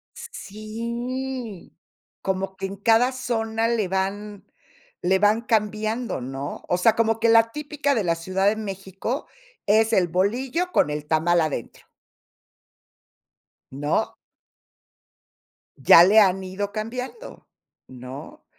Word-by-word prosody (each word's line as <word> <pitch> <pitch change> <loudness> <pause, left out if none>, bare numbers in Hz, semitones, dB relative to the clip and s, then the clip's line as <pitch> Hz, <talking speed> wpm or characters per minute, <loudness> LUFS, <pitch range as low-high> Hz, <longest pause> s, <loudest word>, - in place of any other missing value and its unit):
Sí, 235 +1 -6 0.5
como 190 0 -2
que 195 0 -4
en 195 - -7
cada 225 +5 +3
zona 225 -3 -1
le 230 -4 0
van 195 +2 -3 0.6
le 190 +2 +2
van 210 +3 +3
cambiando, 215 - -1
¿no? 135 +2 -6
O 180 - +2
sea, 215 +5 +4
como 225 -1 +1
que 230 - +2
la 230 0 +5
típica 295 0 -2
de 220 -7 0
la 170 -1 +2
Ciudad 185 +4 -1
de 210 - +3
México 195 +4 -5 0.4
es 220 +2 +3
el 180 -2 +3
bolillo 245 - -1
con - - +2
el 150 0 -4
tamal 165 +2 +2
adentro. 155 -7 -4 1.9
¿No? 145 +2 -1 1.6
Ya 140 +5 +8
le 205 +5 +6
han 190 -2 +3
ido 200 +2 -4
cambiando, 250 - -6 0.4
¿no? 130 +2 -10
210 Hz, 120 wpm, -24 LUFS, 185-230 Hz, 1.9 s, Ya